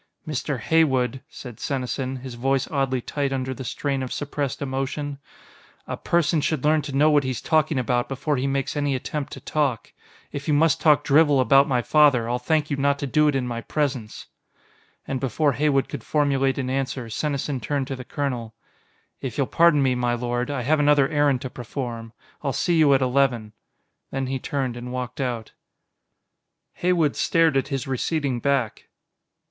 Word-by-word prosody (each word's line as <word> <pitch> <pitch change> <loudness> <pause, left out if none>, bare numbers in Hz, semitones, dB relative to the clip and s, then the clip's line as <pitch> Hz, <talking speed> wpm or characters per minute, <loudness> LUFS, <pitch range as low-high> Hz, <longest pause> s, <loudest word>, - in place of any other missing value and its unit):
"Mr. 145 -2 -2
Heywood," 130 -3 +2
said 125 -7 -10
Senesin, 130 -1 -3
his 130 -1 -7
voice 135 +2 0
oddly 135 -3 0
tight 140 +2 -2
under 130 -1 -2
the 130 +1 -7
strain 135 +3 -2
of 130 - -4
suppressed 145 -1 -3
emotion, 140 +1 -3 0.7
"a - - -4
person 170 -2 +1
should 150 -2 -1
learn 155 +1 +3
to 145 -1 -6
know 150 +3 +5
what 145 -1 +4
he's 130 -2 -2
talking 155 -2 +1
about 125 -1 0
before 145 +2 -1
he 135 +1 -1
makes 135 +1 -1
any 145 -2 0
attempt 140 +2 -4
to - - -7
talk. 140 -7 -1 0.4
If 140 0 -6
you 150 - +3
must 160 0 +3
talk 150 -2 +4
drivel 145 -1 +4
about 135 +2 +5
my 125 -3 +1
father, 140 -6 +4
I'll 120 +1 -1
thank 155 +3 0
you 140 - 0
not 140 0 +2
to 140 - -3
do 150 +3 +3
it 145 - +2
in 130 -2 0
my 120 -1 -4
presence." 130 -8 -3 0.8
And 135 - -2
before 140 +3 +1
Heywood 140 0 +1
could 140 -6 -7
formulate 135 -3 +1
an 130 -2 -2
answer, 130 -2 -2
Senesin 140 +3 -2
turned 140 -2 -1
to 135 - -4
the 130 - -8
colonel. 125 -5 -4 0.7
"If 130 -4 -5
you'll 140 - +2
pardon 165 -1 +4
me, 130 -1 +2
my 125 -1 0
lord, 120 +1 -2
I 140 -4 -2
have 155 +5 +2
another 145 -2 +4
errand 145 -4 +2
to 130 - -5
perform. 120 -2 -6 0.3
I'll 140 -3 -1
see 170 +6 +1
you 155 -3 +5
at 135 - +2
eleven." 125 -4 +1 0.6
Then 135 0 -2
he 130 0 -3
turned 130 -2 -2
and 120 +1 -7
walked 125 0 -4
out. 120 -4 -3 1.2
Heywood 175 -5 +1
stared 165 -3 +2
at 135 - +1
his 135 -3 -3
receding 135 0 -1
back. 135 -5 -1
135 Hz, 185 wpm, -24 LUFS, 125-145 Hz, 1.2 s, know